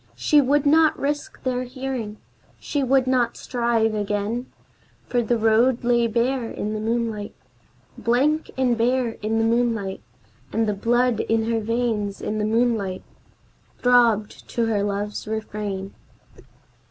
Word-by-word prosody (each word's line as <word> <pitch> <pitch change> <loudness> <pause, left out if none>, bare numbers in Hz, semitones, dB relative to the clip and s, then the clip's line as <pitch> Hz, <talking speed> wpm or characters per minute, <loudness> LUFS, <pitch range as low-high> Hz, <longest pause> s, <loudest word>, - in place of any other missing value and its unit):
She 300 -1 +4
would 285 +2 +2
not 315 +2 +4
risk 290 +7 -3
their 255 -1 -1
hearing, 255 -4 -5 0.4
she 290 - -2
would 265 0 +3
not 250 -2 +1
strive 235 -3 0
again, 210 +3 -2 0.6
For 245 - 0
the 235 +1 +1
road 230 +3 +3
lay 240 -1 +3
bare 235 +1 0
in 210 +1 -4
the 215 - -3
moonlight, 225 -2 -2 0.6
Blank 280 +7 +1
and 255 -2 +2
bare 245 +1 +1
in 220 +2 -1
the 225 - +2
moonlight, 225 -4 0 0.5
And 225 0 +1
the 210 - +1
blood 240 +3 +1
in 225 0 0
her 225 - +1
veins, 220 -3 -1
in 215 0 -3
the 210 - 0
moonlight, 220 -4 0 0.7
throbbed 235 -4 +2
to 235 - 0
her 215 -3 0
love's 205 +1 -3
refrain. 210 -3 -4
230 Hz, 140 wpm, -23 LUFS, 215-250 Hz, 0.7 s, She